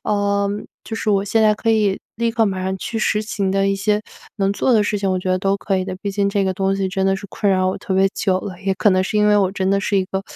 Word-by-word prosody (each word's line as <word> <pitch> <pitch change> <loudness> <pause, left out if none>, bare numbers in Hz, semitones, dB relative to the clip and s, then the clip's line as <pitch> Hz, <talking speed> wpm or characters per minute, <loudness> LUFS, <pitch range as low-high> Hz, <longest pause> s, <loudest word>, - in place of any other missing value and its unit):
呃， 200 -1 +1 0.4
就 225 - -6
是 225 - -3
我 200 -1 +2
现 220 +2 +2
在 215 -1 +4
可 225 +2 -1
以 210 -3 +2 0.2
立 235 0 0
刻 225 -1 +2
马 190 -2 -2
上 190 0 -2
去 225 - -4
实 210 0 +1
行 210 -3 -2
的 195 0 +1
一 195 - +1
些 210 +1 0 0.4
能 195 -2 +1
做 250 +5 +1
的 220 -3 +4
事 210 - 0
情 195 -1 -1
我 185 - 0
觉 185 0 -4
得 185 - +3
都 195 +1 +1
可 195 0 -1
以 185 - -2
的。 185 -1 -5
毕 200 - -2
竟 200 0 +1
这 200 0 0
个 190 - 0
东 195 +1 0
西 195 - -1
真 190 0 -1
的 195 - +2
是 200 +1 -9
困 200 - 0
扰 185 -1 +2
我 185 - -2
特 190 - -5
别 190 +1 +4
久 185 -1 +1
了， 185 -3 -8
也 195 - +1
可 205 +2 +3
能 185 0 +3
是 200 - -2
因 210 - +4
为 210 - +5
我 195 -2 +2
真 190 -1 -1
的 195 - +2
是 205 0 0
一 190 - +2
个， 190 +1 -4
195 Hz, 335 characters per minute, -20 LUFS, 190-210 Hz, 0.4 s, 为